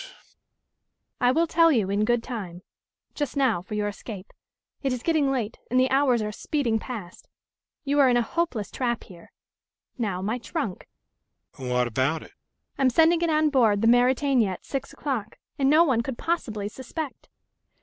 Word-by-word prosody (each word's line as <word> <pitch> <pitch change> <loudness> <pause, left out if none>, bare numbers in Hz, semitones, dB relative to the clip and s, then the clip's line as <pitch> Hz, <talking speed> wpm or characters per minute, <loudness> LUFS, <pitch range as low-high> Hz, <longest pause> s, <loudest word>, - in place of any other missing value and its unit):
"I 245 - +4
will 330 +5 +2
tell 330 0 +4
you 215 -8 +1
in 205 +1 +1
good 240 0 +1
time. 185 -8 -6 0.5
Just 290 -2 -3
now 255 -10 +2
for 200 +4 -7
your 210 0 0
escape. 205 -1 -8 0.5
It 270 - 0
is 250 - -5
getting 310 -5 +2
late, 235 -5 -3
and 255 - +2
the 255 0 +2
hours 265 -4 +3
are 210 - -3
speeding 235 -1 -1
past. 210 -8 -8 0.5
You 285 +1 +1
are 270 -2 +6
in 245 - +3
a 240 - +2
hopeless 250 - -2
trap 240 -3 -2
here. 175 -4 -15 0.7
Now, 200 -6 -1
my 220 +5 -1
trunk..." 240 - -4 0.7
"What 125 -1 0
about 130 +7 0
it?" - - -15 0.5
"I - - -1
am 265 - +5
sending 325 +5 +4
it 340 - +1
on 310 -1 +2
board 225 -6 +3
the - - +4
Mauretania 245 -2 +3
at - - -11
six 275 -1 -4
o'clock, 240 -7 -4 0.2
and 270 -1 +3
no 310 +3 +6
one 260 -8 +2
could 235 +1 -5
possibly 220 -12 -2
suspect." 265 +6 -7
245 Hz, 175 wpm, -25 LUFS, 210-280 Hz, 0.7 s, are